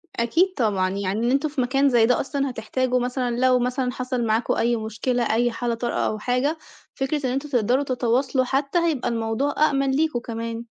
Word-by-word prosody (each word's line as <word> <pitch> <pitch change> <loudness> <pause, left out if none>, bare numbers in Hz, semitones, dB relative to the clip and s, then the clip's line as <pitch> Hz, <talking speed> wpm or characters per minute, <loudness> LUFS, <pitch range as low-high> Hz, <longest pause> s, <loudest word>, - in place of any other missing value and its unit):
أكيد 330 +11 +2
طبعًا 200 -7 +1
يعني 195 +1 -2
إن 235 +2 +1
أنتم 280 +3 +1
في 285 -2 -2
مكان 270 +3 +2
زي 240 -3 +4
ده 250 +2 +2
أصلًا 275 0 -2
هتحتاجوا 255 0 -1
مثلًا 250 -1 -2
لو 255 0 +4
مثلًا 250 +1 -1
حصل 255 -1 -2
معاكم 220 +1 +1
أي 235 +1 +1
مشكلة 225 +3 -2
أي 240 +2 +2
حالة 235 +1 -2
طارئة 240 +1 -3
أو 215 - -3
حاجة، 255 +7 0 0.4
فكرة 275 +1 -2
إن - - -1
أنتم 275 +3 -3
تقدروا 250 +1 +2
تتواصلوا 255 0 0
حتّى 275 +6 0
هيبقى 320 -8 0
الموضوع 230 +4 -1
أأمن 275 -2 0
ليكم 300 -2 +1
كمان. 230 0 -5
250 Hz, 190 wpm, -23 LUFS, 235-275 Hz, 0.4 s, زي